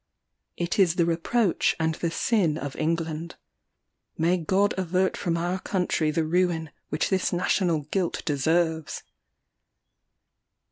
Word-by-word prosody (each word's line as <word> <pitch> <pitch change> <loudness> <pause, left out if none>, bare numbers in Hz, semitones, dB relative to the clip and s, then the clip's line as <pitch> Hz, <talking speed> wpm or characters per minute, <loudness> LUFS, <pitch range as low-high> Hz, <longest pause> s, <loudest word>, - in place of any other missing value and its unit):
It 175 +3 -2
is 180 -3 +4
the 170 - +3
reproach 175 +5 +1
and 160 0 +1
the 170 +1 -2
sin 170 -3 +1
of 145 -3 -5
England. 165 0 -2 0.8
May 170 +3 +3
God 190 +4 +1
avert 185 0 0
from 170 -1 -1
our 175 +2 -1
country 180 -5 0
the 160 +1 0
ruin 165 -2 0 0.2
which - - -1
this 190 -1 +1
national 175 -2 +1
guilt 170 +5 -2
deserves! 160 +2 0
170 Hz, 125 wpm, -26 LUFS, 160-185 Hz, 0.8 s, is